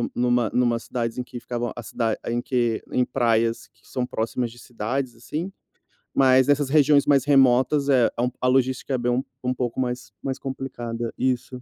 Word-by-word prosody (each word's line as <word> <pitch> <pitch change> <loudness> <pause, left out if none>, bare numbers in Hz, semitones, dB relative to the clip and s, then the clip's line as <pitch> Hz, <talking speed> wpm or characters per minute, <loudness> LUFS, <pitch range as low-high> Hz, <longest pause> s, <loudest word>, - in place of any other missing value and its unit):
numa 120 -2 +2
numa 120 -2 +2
cidades 115 0 -4
em 125 - -2
que 125 -1 -8
ficavam 120 -1 -3
a 120 - -7
cida 115 +1 -1
em 120 +1 0
que 120 -4 0
em 125 - +3
praias 115 -1 +1
que - - -32
são 125 -1 -2
próximas 115 +1 -2
de 120 - -15
cidades, 120 +2 -3
assim. 155 +11 -5 0.6
Mas 130 -1 +5
nessas 145 -1 +2
regiões 145 -1 +5
mais 140 -3 +3
remotas, 135 0 +4
eh, 125 -4 +4
é - - 0
um 125 - +2
p 125 - -25
a 125 - +2
logística 130 +1 +1
é - - 0
bem 120 0 0 0.3
um 125 0 0
pouco 125 -1 -3
mais 125 0 -4
mais 135 -1 -3
complicada. 120 -3 -5
Isso. 125 0 -1
125 Hz, 190 wpm, -24 LUFS, 120-130 Hz, 0.6 s, Mas